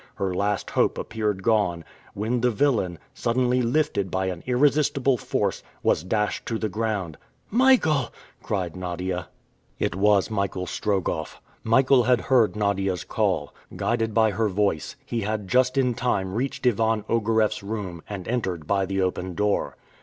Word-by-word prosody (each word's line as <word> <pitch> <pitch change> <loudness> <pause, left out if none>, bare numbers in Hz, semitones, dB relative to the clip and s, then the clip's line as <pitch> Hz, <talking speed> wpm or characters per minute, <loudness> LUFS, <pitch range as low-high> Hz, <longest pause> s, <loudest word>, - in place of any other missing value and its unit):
Her 95 -2 -2
last 100 +2 -1
hope - - +2
appeared 105 -3 -2
gone, 95 -7 +1 0.3
when 115 +4 -1
the 125 - +3
villain, 110 -8 +1 0.2
suddenly 125 +1 +1
lifted 120 -6 0
by 95 +2 -1
an 90 -2 -5
irresistible 135 0 +3
force, 120 - -1 0.2
was - - +2
dashed 105 +3 -1
to 115 - -1
the 110 -1 -2
ground. 100 -6 -3 0.3
"Michael!" 205 - +4 0.3
cried 90 -5 -3
Nadia. 90 0 -3 0.5
It - - -1
was 100 +1 +3
Michael 100 -3 -1
Strogoff. 95 -5 -2 0.2
Michael 130 +3 +4
had 125 -1 +3
heard 125 -6 +3
Nadia's 100 -4 0
call. - - -1 0.2
Guided 115 -1 0
by 110 -1 +4
her 110 +2 0
voice, 100 -5 -1
he 115 - -2
had 105 -1 -2
just 130 +4 +2
in 125 -2 +3
time 115 -6 -1
reached 130 +4 -3
Ivan 110 -2 +2
Ogareff's 110 -1 +1
room, 100 -5 -5
and 100 -4 -6
entered 95 -10 -2
by 95 +2 +1
the 95 0 0
open 90 -1 -2
door. 105 +2 0
105 Hz, 150 wpm, -25 LUFS, 95-120 Hz, 0.5 s, Michael